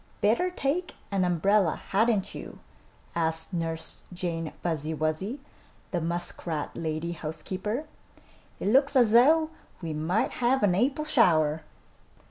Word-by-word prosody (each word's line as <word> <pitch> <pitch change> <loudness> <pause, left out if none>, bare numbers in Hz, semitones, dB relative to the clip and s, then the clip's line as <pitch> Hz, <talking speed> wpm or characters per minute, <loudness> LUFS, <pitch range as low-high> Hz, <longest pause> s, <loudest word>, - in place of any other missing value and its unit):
"Better 235 - +2
take 355 +1 -2 0.2
an 195 -2 +1
umbrella, 180 +1 +2
hadn't 215 -1 +2
you?" - - -8 0.6
asked 160 +1 0
Nurse 165 -1 -4
Jane 170 -3 -3
Fuzzy 160 -2 -1
Wuzzy, 155 - -2 0.5
the 175 - -1
muskrat 170 -2 -2
lady 160 +1 -3
housekeeper. 190 - -4 0.7
"It - - 0
looks 275 +5 +4
as 240 -5 +5
though 310 +7 +5 0.3
we 165 -3 -4
might 160 +7 0
have 250 +1 +3
an 195 -3 +4
April 270 +10 +1
shower." 160 - +3
185 Hz, 120 wpm, -28 LUFS, 160-240 Hz, 0.7 s, as